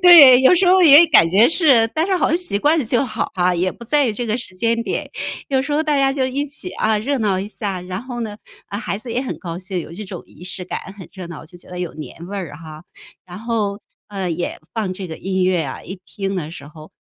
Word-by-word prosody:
对， 285 -8 +9
有 265 +7 +6
时 365 +1 +3
候 370 0 +5
也 315 +1 +9
感 295 - +5
觉 205 +7 +5
是， 275 -10 +4
但 320 +3 +1
是 380 -2 +1
好 315 - +1
像 335 - +2
习 355 - +1
惯 310 +7 +2
了 275 - 0
就 240 +4 +1
好 235 - -3
哈， 180 -1 +1
也 180 +2 0
不 235 - -12
在 290 +2 +2
于 - - -1
这 240 +3 -3
个 220 +2 0
时 210 -6 -7
间 230 +3 0
点， - - -4 0.4
有 265 -1 +1
时 290 +1 -4
候 305 +2 +2
大 300 -2 0
家 270 0 +2
就 265 -2 0
一 275 +3 -2
起， 295 +5 0
啊， 215 -1 +1
热 275 +5 -1
闹 200 -4 0
一 200 - -4
下。 200 -4 -4
然 185 +4 -6
后 245 -2 -6
呢， 210 -2 -5 0.3
啊， 200 - -5
孩 210 -2 -4
子 230 0 -6
也 250 - -1
很 260 - -5
高 170 -2 -6
兴， 185 0 -4
有 165 - -9
这 210 +4 -7
种 185 -2 -8
仪 - - -17
式 185 0 -6
感， - - -4 0.2
很 185 - -10
热 185 -3 -8
闹， 160 -2 -9
就 175 +2 -14
觉 - - -15
得 180 0 -8
有 175 - -5
年 165 +2 -9
味 200 +1 -6
儿 170 -6 -6
哈。 155 0 -11 0.4
然 180 +1 -9
后， 215 -3 -2 0.3
呃， 190 -3 -4
也 175 +2 -3 0.2
放 210 -5 -2
这 185 0 -6
个 160 - -7
音 190 -1 -1
乐 185 -2 +2
呀， 135 - -6
一 190 -1 -9
听 195 +3 -4
的 155 -3 -4
时 140 -4 -10
候， 155 +1 -13
210 Hz, 290 characters per minute, -19 LUFS, 180-265 Hz, 0.4 s, 对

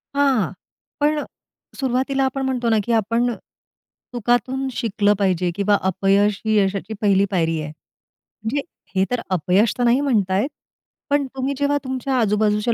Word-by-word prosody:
हां. 265 - +2 0.5
पण 300 +1 +2
अ, - - -4 0.5
सुरुवातीला 265 +1 0
आपण 270 +1 -2
म्हणतो 250 -3 0
ना, 220 - +3
की 235 - -3
आपण 230 +3 +1 0.8
चुकातून 245 +3 0
शिकलं 210 -3 +1
पाहिजे 185 -2 +1
किंवा 205 0 +2
"अपयश 195 +2 +2
ही 215 -1 +2
यशाची 195 +1 0
पहिली 200 -1 +4
पायरी 165 -3 +1
आहे." 150 - -5
म्हणजे 220 - -8 0.3
हे 190 +1 +3
तर 245 -2 0
अपयश 185 +5 +2
तर 245 - 0
नाही 245 +3 +4
म्हणता 205 -9 +1
येत. 270 - 0 0.6
पण 285 -1 +2
तुम्ही 265 +2 -1
जेव्हा 285 0 +1
तुमच्या 260 0 -2
आजूबाजूचे 210 +1 +2
225 Hz, 150 wpm, -21 LUFS, 200-260 Hz, 0.8 s, पहिली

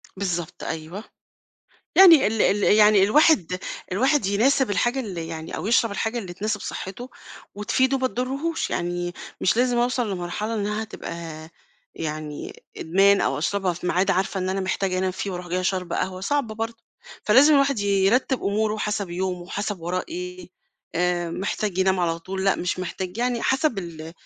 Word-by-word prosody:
بالضبط 175 -4 -3
أيوه. 165 +6 -5 0.9
يعني 340 -7 +8
ال 220 +1 +1
ال 200 +1 +2
يعني 210 -1 +6
الواحد 200 - +4 0.3
الواحد 265 +4 +2
يناسب 240 +5 +2
الحاجة 240 +6 +1
اللي 180 -9 -5
يعني 160 0 -6
أو - - -4
يشرب 230 0 +3
الحاجة 220 +4 -2
اللي 185 -5 -6
تناسب 210 +2 -2
صحّته 240 +7 -6 0.4
وتفيده 260 +6 +1
ما 260 - +1
تضرّهوش، 275 +7 -2
يعني 175 0 -2 0.3
مش 185 - +2
لازم 245 0 +2
أوصل 245 -2 0
لمرحلة 190 +5 -3
إنّها 210 +1 -2
تبقى 210 -5 -7 0.8
يعني 155 -1 -6
إدمان 195 +4 +3
أو - - 0
أشربها 195 -3 0
في 175 +1 -7
ميعاد 185 +2 +2
عارفة 190 +1 0
إن 185 - -2
أنا 195 +1 -1
محتاجة 190 0 -1
أنام 185 0 0
فيه 195 +2 -4
وأروح 180 -1 -6
جاية 185 +1 -1
شاربة 185 -2 -1
قهوة، 185 0 -2
صعب 280 +5 0
برضه. 225 +1 -6 0.4
فلازم 270 +8 +6
الواحد 275 -3 +3
ي 205 - -2 0.2
يرتّب 255 +4 +2
أموره 210 +2 0
حَسَب 210 -3 -2
يومه، 180 0 -3
حَسَب 205 -3 -3
وراه 180 +2 -2
إيه، 360 +2 -7 0.5
آآ 175 -1 0
محتاج 195 +1 -3
ينام 190 0 +2
على 165 -1 0
طول، 190 +3 -5
لأ 195 - +3
مش 180 +1 -2
محتاج، 185 +2 -5
يعني 245 -1 0
حَسَب 265 -4 +1
ال 165 -3 -7
200 Hz, 165 wpm, -24 LUFS, 180-235 Hz, 0.9 s, يعني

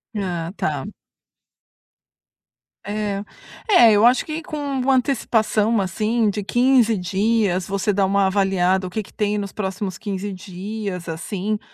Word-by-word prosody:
Ah, 175 -5 -3
tá. - - -2 2.0
É. 205 -1 -3 0.5
É, 245 - +7
eu 210 +2 +5
acho 245 +1 +4
que 310 +1 -4
com 305 -1 -7
uma 275 -2 0
antecipação, 225 -4 +1
assim, 215 +4 0
de 205 +1 -4
15 240 0 +3
dias, 190 0 0
você 200 +1 0
dá 195 0 +2
uma 200 +1 +2
avaliada 190 -1 +1
o - - -6
que 215 +4 -3
que - - -18
tem 210 0 0
nos 200 -1 -4
próximos 190 -2 -4
15 200 -1 -4
dias, 190 0 -6
assim, 195 +5 -3
205 Hz, 140 wpm, -21 LUFS, 190-225 Hz, 2.0 s, É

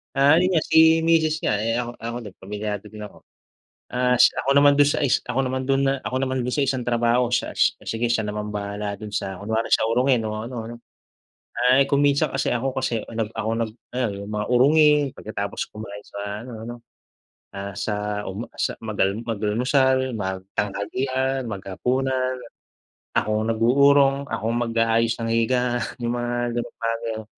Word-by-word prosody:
Ah, 140 +3 +6
yun 185 +1 +2
nga 155 - +4
si 160 0 +5
misis 160 -1 +2
nga, 105 - +1
eh, 115 +1 0
ako 120 0 -5
ako 115 +1 -4
din 100 - -10
pamilyado 105 +1 -4
din 105 -1 -8
ako. - - -18 0.7
Ah, 125 0 +2
s 125 - +7
ako 135 - +1
naman 145 0 +6
dun 145 - +6
sa - - 0
is 130 - +3
ako 125 +2 0
naman 130 0 -2
dun 135 0 +2
na 135 0 0
ako 130 - -3
naman 130 0 -2
dun 125 - -1
sa 140 - +2
isang 130 -2 -1
trabaho, 120 0 +2
siya 125 - 0
si - - +3
sige, 115 +1 -1
siya 115 -2 +1
naman 105 0 -4
bahala 100 0 -3
dun 105 -1 -8
sa 95 -2 -3
kunwari 110 +2 -1
sa - - +4
urongin 125 +1 +2
o - - -4 0.2
ano 125 - -8
'no. 120 - -8 1.0
Ay, 135 +1 +5
kung 140 0 +3
minsan 140 +1 +2
kasi, 135 - -1
ako 125 +2 -1
kasi 120 -4 -1
ang 115 - -8
nag - - -17
ako 110 0 -2 0.2
nag - - -11 0.2
ayu 100 -6 -2
yung - - -7
mga 105 0 -1
urungin 150 +4 +5 0.2
pagkatapos 100 -1 -4
kumain 105 -1 -8
sa 100 +2 -6
ano, 125 - -9 0.2
ano. 120 - -6 0.8
Ah, 100 0 -6
sa 105 -1 -3
uma 105 +5 -6
sa - - -1
mag-al 100 -1 0
mag-almusal, 125 +4 +1
magtanghalian, 105 +7 -2
maghapunan. 130 +6 -1 0.8
Ako - - +1
ang - - -3
nag-uurong, 135 +4 +4
akong 115 +1 -1
mag-aayos 115 0 +2
ng 115 - -2
higaan, 120 +1 +1 0.2
yung 120 0 0
mga 120 0 -1
gano'ng 120 0 -4
bagay 115 0 -1
o - - -13
120 Hz, 180 wpm, -23 LUFS, 105-130 Hz, 1.0 s, s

